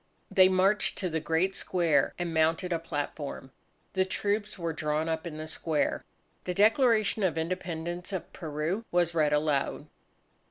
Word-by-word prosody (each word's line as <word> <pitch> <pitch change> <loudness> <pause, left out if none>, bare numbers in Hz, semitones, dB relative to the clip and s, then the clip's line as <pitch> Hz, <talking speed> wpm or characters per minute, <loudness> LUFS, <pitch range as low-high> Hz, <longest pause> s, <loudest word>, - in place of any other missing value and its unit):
They 185 -1 +6
marched 190 +3 +3
to 185 - -2
the 160 - 0
great 165 +5 0
square, 170 -7 +1
and 175 -2 -3
mounted 165 +3 +2
a 165 - 0
platform. 145 -3 -5 0.4
The 190 - +3
troops 205 +2 -2
were 170 -2 -2
drawn 150 +1 -1
up 160 +1 -2
in 155 -2 -7
the 155 - -5
square. 155 -1 -1 0.4
The 180 - -2
Declaration 220 0 +3
of 175 -5 +1
Independence 175 +1 -3
of 190 -3 -5
Peru 160 +6 -3
was 175 -1 +2
read 155 -3 +2
aloud. 150 -1 0
170 Hz, 155 wpm, -29 LUFS, 155-185 Hz, 0.4 s, They